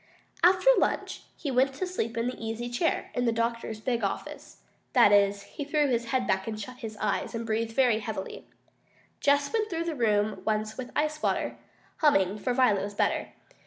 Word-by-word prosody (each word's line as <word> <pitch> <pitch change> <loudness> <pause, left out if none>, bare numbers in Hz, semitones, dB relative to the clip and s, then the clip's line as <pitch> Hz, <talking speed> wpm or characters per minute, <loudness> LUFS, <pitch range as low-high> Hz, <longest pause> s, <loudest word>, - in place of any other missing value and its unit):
After 370 +7 +6
lunch - - -1 0.2
he 285 - -3
went 265 +1 +2
to 370 - -2
sleep 235 -11 -3
in 230 - 0
the 250 -2 -4
easy 225 +2 -3
chair 285 +8 -1
in 245 - 0
the 230 - +3
doctor's 230 -1 -2
big 235 0 -1
office. 195 - -5 0.3
That 235 -5 +6
is, 200 0 +3
he 290 - -7
threw 295 0 +1
his 235 -2 0
head 250 +2 0
back 190 -1 0
and 215 -1 -4
shut 250 +4 -7
his 220 -4 -7
eyes, 210 +2 -1
and 230 0 -3
breathed 225 0 -1
very 245 -4 +3
heavily. 210 -3 -6 0.7
Jess 285 +3 +2
went 435 -1 0
through 330 -1 -2
the 335 - -2
room 215 -5 +1
once 215 0 -1
with 255 -1 -6
ice 305 0 0
water, - - 0 0.4
humming, 205 - +3
for 250 - -1
Violet 245 -6 +3
was 200 +1 -5
better. - - 0
230 Hz, 195 wpm, -28 LUFS, 215-270 Hz, 0.7 s, After